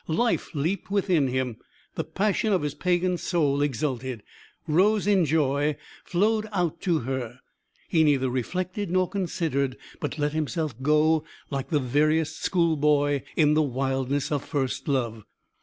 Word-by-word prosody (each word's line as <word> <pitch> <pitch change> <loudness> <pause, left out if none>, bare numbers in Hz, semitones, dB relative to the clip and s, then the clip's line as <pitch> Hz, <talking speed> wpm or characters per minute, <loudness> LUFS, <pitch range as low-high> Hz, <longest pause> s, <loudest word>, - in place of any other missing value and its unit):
Life 220 +2 0
leaped 165 +8 -1
within 185 -8 +2
him. 125 -3 -2 0.4
The - - -2
passion 210 +2 0
of 180 - +1
his 145 -1 -2
pagan 180 +2 0
soul 150 -5 +1
exulted, 130 -4 -2 0.4
rose 195 +7 +3
in 200 -4 +4
joy, 145 -1 +1 0.3
flowed 215 +4 +1
out 175 -4 -1
to 170 -5 +1
her. 125 -1 -4 0.5
He 160 -3 +3
neither 140 -4 +3
reflected 180 - -2
nor 185 +1 +2
considered, 165 -9 -1 0.2
but - - -4
let 145 0 0
himself 155 -1 -1
go 150 +2 +3 0.3
like 135 -1 -3
the 150 - +2
veriest 155 +4 +1
schoolboy 150 -5 +2
in 150 -2 +4
the 155 - +4
wildness 135 0 -1
of 145 -2 0
first 135 -4 -2
love. 120 -6 -1
150 Hz, 140 wpm, -26 LUFS, 135-175 Hz, 0.5 s, in